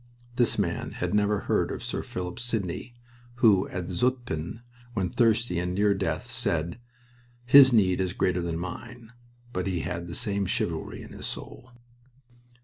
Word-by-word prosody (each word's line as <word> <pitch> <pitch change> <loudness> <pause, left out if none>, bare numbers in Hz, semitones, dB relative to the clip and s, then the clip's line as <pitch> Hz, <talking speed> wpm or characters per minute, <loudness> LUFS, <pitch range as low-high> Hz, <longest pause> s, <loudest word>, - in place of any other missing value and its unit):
This 120 -2 +2
man 90 -5 -1
had - - -2
never 105 0 +2
heard - - +1
of - - -5
Sir - - -3
Philip 90 +3 -5
Sidney, 115 0 -3 0.4
who 110 -6 +4
at 90 -1 -4
Zutphen, 115 -4 -1 0.3
when 95 -4 0
thirsty 115 -6 +2
and 90 +1 -2
near 100 +1 +4
death, 95 +5 -2
said, 85 -7 -1 0.7
"His 130 +1 +9
need 95 -5 +3
is 90 -1 -1
greater 90 -1 +1
than 85 -1 -2
mine," 115 +7 -7 0.4
but 90 +1 -2
he 90 -3 -1
had 85 +1 -4
the 85 - -6
same 100 -5 -1
chivalry - - -2
in - - -12
his - - -6
soul. 130 - -7
100 Hz, 155 wpm, -27 LUFS, 90-120 Hz, 0.7 s, His